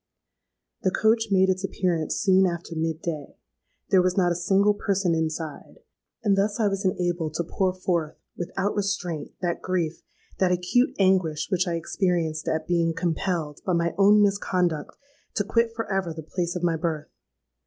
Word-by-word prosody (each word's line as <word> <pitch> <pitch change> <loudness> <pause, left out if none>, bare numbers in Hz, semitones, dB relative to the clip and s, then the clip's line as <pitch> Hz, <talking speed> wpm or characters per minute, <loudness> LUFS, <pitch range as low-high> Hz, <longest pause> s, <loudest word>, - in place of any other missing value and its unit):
"The 190 - +2
coach 220 +4 +2
made 190 -1 +4
its 185 0 0
appearance 175 -5 -1
soon 190 -1 +4
after 170 -1 -5
mid 160 0 -2
day: 155 -4 -5 0.5
there 190 - +6
was 180 +1 0
not 175 -2 +3
a - - 0
single 195 +4 +3
person 195 -3 0
inside; 160 -1 -3 0.5
and 205 -3 +3
thus 205 +3 0
I 215 - +3
was 195 +1 -3
enabled 175 -4 -1
to 170 - 0
pour 185 +3 0
forth, 175 -4 -2 0.2
without 195 +3 -2
restraint, 180 -7 -2
that 175 -1 -1
grief—that 180 +1 -2
acute 180 - +2
anguish 185 -6 +2
which 185 0 +1
I 170 - 0
experienced 165 -2 -1
at 160 0 -1
being 170 -2 +1
compelled, 165 -2 -2
by 185 - 0
my 170 0 +1
own 205 +1 +6
misconduct, 180 -6 0 0.4
to 205 - +1
quit 230 +3 +1
for 225 -1 -2
ever 185 -4 -1
the 160 - -7
place 175 +2 -3
of 180 - -4
my 170 -2 +2
birth. 155 -2 -3
180 Hz, 165 wpm, -25 LUFS, 165-195 Hz, 0.5 s, there